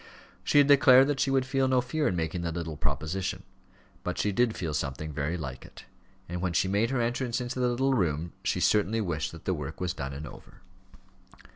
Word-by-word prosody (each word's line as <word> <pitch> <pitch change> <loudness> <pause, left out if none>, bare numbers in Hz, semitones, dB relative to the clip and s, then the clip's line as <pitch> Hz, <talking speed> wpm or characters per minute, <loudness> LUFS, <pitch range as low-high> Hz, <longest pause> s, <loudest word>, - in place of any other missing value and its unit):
She - - +2
had 145 - +8
declared 135 -2 +7
that 145 -2 -1
she - - +2
would 135 -1 +2
feel 135 0 +1
no 130 -1 +3
fear 145 +5 -1
in 90 - 0
making 80 +1 -2
the 85 -1 -2
little 80 -2 -4
proposition. 80 +6 -3 0.6
But - - -3
she 105 - +1
did 115 +2 +1
feel 80 -4 -3
something 75 +1 -3
very 75 +4 -2
like 65 -5 -6
it; - - -14 0.4
and 90 +1 -4
when 90 -2 -1
she 85 - +2
made 100 +4 +1
her 135 -1 0
entrance 120 0 -1
into 125 +1 -4
the 125 - +2
little 135 +3 +1
room 85 - 0
she - - 0
certainly 105 +1 +2
wished 80 -6 -2
that 80 - -12
the 95 - +1
work 75 -2 -6
was 90 -1 -1
done 70 -4 -5
and 75 +2 -6
over. 70 - -13
95 Hz, 220 wpm, -28 LUFS, 80-125 Hz, 0.6 s, had